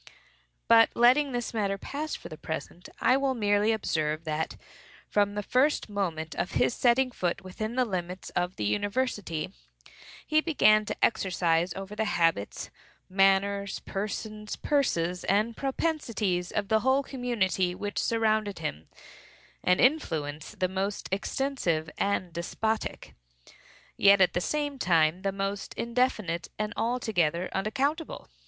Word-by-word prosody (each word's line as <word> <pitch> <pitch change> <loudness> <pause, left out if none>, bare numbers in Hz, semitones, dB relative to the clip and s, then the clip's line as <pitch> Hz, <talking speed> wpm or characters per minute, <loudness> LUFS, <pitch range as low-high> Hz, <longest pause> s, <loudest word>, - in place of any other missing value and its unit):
But, 225 0 +7
letting 260 +4 +5
this 240 -1 -3
matter 200 -3 0
pass 295 +8 -4
for - - -9
the 155 - -8
present, 160 +3 -6
I 255 - +4
will 270 -1 0
merely 205 -1 +2
observe 155 -7 -1
that, 160 0 -2 0.5
from 205 0 +1
the 210 - -2
first 260 +3 +2
moment 165 -6 -2
of 175 - -3
his - - +2
setting 255 +2 +3
foot 180 -7 -2
within 215 +5 -5
the 255 -1 +3
limits 180 -3 -4
of 180 +1 -1
the - - -4
university, 205 - -1 0.7
he 310 0 +3
began 215 -10 +4
to - - +1
exercise 175 -4 +1
over 195 +2 -7
the 220 +1 0
habits, 165 - 0 0.4
manners, 195 +1 +2
persons, 210 +1 -4
purses, 180 - 0
and 215 +4 +1
propensities 230 - -1
of 205 -2 -1
the 220 - +4
whole 265 +4 +2
community 195 - -1
which 205 +2 -3
surrounded 220 -3 +1
him, 75 +3 -5 0.8
an 180 0 +3
influence 155 - +1
the 185 - +1
most 195 +2 -3
extensive 190 - -1
and 185 -4 0
despotic, 220 +6 -3 0.8
yet 200 0 +6
at 185 - +4
the 175 - 0
same 290 +3 -2
time 165 -2 +3
the 195 0 0
most 195 +1 -4
indefinite 230 -8 0
and 215 +1 -2
altogether 185 -8 0
unaccountable. 280 - -2
205 Hz, 135 wpm, -28 LUFS, 180-240 Hz, 0.8 s, But